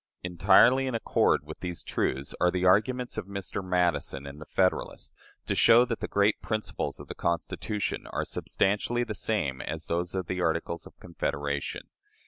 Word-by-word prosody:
Entirely 95 +9 +5
in 130 - -2
accord 115 - +2
with 75 +1 -9
these 90 -2 -5
truths 70 +2 -2
are 90 - +5
the 90 0 -1
arguments 110 +6 +2
of 100 - -7
Mr. 100 0 -5
Madison 90 -6 0
in 70 +1 -9
the 75 - -10
"Federalist," 95 -1 0 0.3
to - - 0
show 120 +2 +6
that 115 -2 -3
the - - -3
great 100 +1 +2
principles 110 0 -3
of - - -10
the - - -5
Constitution 85 +4 -2
are - - -3
substantially 105 +5 0
the 115 -3 -4
same 100 -12 -1
as 80 0 -5
those 85 +2 -2
of 95 -1 -1
the 90 +1 -3
Articles 85 0 -1
of - - -19
Confederation. 70 -4 -3
90 Hz, 170 wpm, -28 LUFS, 85-105 Hz, 0.3 s, show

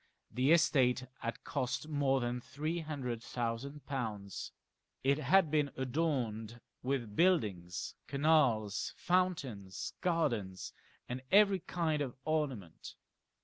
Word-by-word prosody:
The 130 +5 +2
estate 130 -6 +4
had 115 -1 -4
cost 130 +4 -2
more 140 -3 +2
than 120 +1 -2
three 155 +7 -3
hundred 135 -7 -4
thousand 120 +5 -4
pounds. 110 -8 -4 0.5
It 140 +2 +3
had 155 +3 +4
been 150 -2 +2
adorned 125 -5 -1 0.2
with 125 -5 -2
buildings, 105 - +1
canals, 140 -9 +2
fountains, 140 - -1
gardens, 120 - 0 0.3
and 125 +1 -4
every 200 -1 +6
kind 165 -3 -1
of 130 -4 -3
ornament. 135 - -2
135 Hz, 105 wpm, -34 LUFS, 115-155 Hz, 0.5 s, every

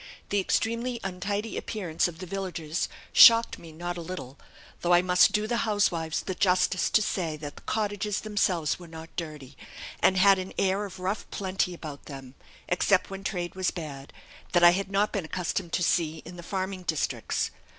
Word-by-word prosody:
The 205 - +1
extremely 230 +5 0
untidy 200 +3 -3
appearance 180 -8 -1
of 170 -2 -8
the 185 - -7
villagers 175 -4 -3 0.2
shocked 230 0 +8
me 165 - -12
not 175 +2 -5
a - - -5
little, 160 -6 -7 0.4
though 175 0 +3
I 175 - +4
must 180 0 +5
do 210 0 +1
the 235 +2 -1
housewives 195 -8 0
the 190 - -3
justice 185 0 +2
to 215 - +3
say 165 -6 -2
that 145 -1 -8
the - - -13
cottages 210 -1 -2
themselves 185 -8 0
were 175 - -11
not 165 0 -11
dirty, 150 -6 -6 0.4
and 190 - +3
had 195 0 +6
an 185 0 -6
air 195 +2 +1
of 190 -2 -9
rough 190 +3 -3
plenty 185 -2 -2
about 150 -4 -9
them 135 -3 -9 0.3
(except 185 +2 +2
when 195 0 -6
trade 175 -3 -3
was 185 -1 0
bad), 145 -5 -7 0.4
that 175 -1 +4
I 175 - +10
had 195 +2 -2
not 200 +2 +1
been 195 -5 -2
accustomed 175 +1 -3
to 180 - +1
see 160 -2 0
in 175 +2 -9
the 175 - -8
farming 190 +1 -3
districts. 160 -4 -1
180 Hz, 185 wpm, -27 LUFS, 165-195 Hz, 0.4 s, I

